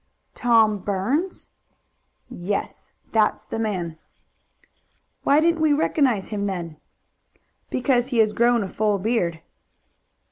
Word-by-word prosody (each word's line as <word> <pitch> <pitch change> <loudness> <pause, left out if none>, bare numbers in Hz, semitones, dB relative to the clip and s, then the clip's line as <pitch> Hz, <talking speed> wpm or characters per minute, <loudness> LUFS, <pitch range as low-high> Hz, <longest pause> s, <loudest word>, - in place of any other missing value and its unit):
"Tom 225 -3 +3
Burns?" 210 - -2 0.8
"Yes. 195 +4 -5 0.2
That's 215 -1 +2
the 225 - -5
man." 180 -7 -3 1.2
"Why 285 +2 +4
didn't 330 0 +2
we 310 -2 +4
recognize 275 -8 +1
him 205 -1 -2
then?" 170 -5 -5 0.9
"Because 250 -1 +1
he 255 -3 -2
has 215 -1 +3
grown 235 -1 +3
a - - -4
full 210 +1 0
beard." 185 -6 -1
220 Hz, 110 wpm, -23 LUFS, 195-250 Hz, 1.2 s, Why